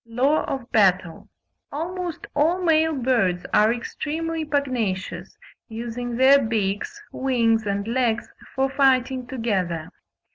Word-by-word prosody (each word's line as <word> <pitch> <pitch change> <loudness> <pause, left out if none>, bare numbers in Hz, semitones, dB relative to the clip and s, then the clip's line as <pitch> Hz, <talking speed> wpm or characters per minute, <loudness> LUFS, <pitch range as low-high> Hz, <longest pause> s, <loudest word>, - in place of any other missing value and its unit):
LAW 260 +7 +1
OF 260 -3 -5
BATTLE. 185 -5 +2 0.4
Almost 345 +3 -4
all 320 +5 +2
male 320 -1 +3
birds 230 -9 +1
are 215 +1 +5
extremely 320 +7 -3
pugnacious, 255 -10 -2 0.3
using 235 +1 -5
their 270 +3 +6
beaks, 220 - -2
wings, 230 -4 +1
and 200 +1 -2
legs 235 -1 0 0.3
for 265 0 +2
fighting 265 -2 +2
together. 190 -10 -2
245 Hz, 110 wpm, -23 LUFS, 220-280 Hz, 0.4 s, their